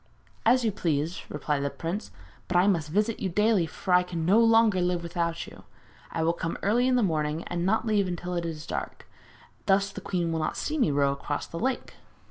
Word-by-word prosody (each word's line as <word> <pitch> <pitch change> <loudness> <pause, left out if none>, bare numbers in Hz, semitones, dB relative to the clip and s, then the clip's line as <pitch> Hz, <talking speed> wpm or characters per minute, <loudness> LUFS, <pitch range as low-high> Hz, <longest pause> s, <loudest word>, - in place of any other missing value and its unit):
'As 250 +1 +4
you 220 - +2
please,' 160 -3 -1
replied 150 -1 -2
the 140 - 0
prince; 170 +9 -4 0.4
'but 180 - +1
I 180 - +5
must 170 -7 +1
visit 210 +6 0
you 190 - -1
daily, 210 -1 +2
for 180 +3 -3
I 180 - +7
can 180 -2 -4
live - - -2
no 210 +4 +6
longer 225 -5 +4
without 170 0 -2
you! - - -13 0.5
I 165 - -2
will 165 +1 +2
come 165 -1 -3
early 235 +5 +3
in 255 - +3
the 245 - +3
morning 155 -2 0
and 175 +1 -2
not 220 +3 +2
leave 210 -3 +2
until 180 0 -4
it 175 -1 -1
is 160 -2 -5
dark; - - -5 0.6
thus 195 0 +3
the 200 - -8
queen 175 -3 -1
will 165 - -1
not 155 - -2
see 310 +1 -2
me 240 - +3
row 140 -1 +2
across 140 +1 -3
the 165 - -7
lake.' 260 +4 -2
180 Hz, 220 wpm, -27 LUFS, 165-210 Hz, 0.6 s, I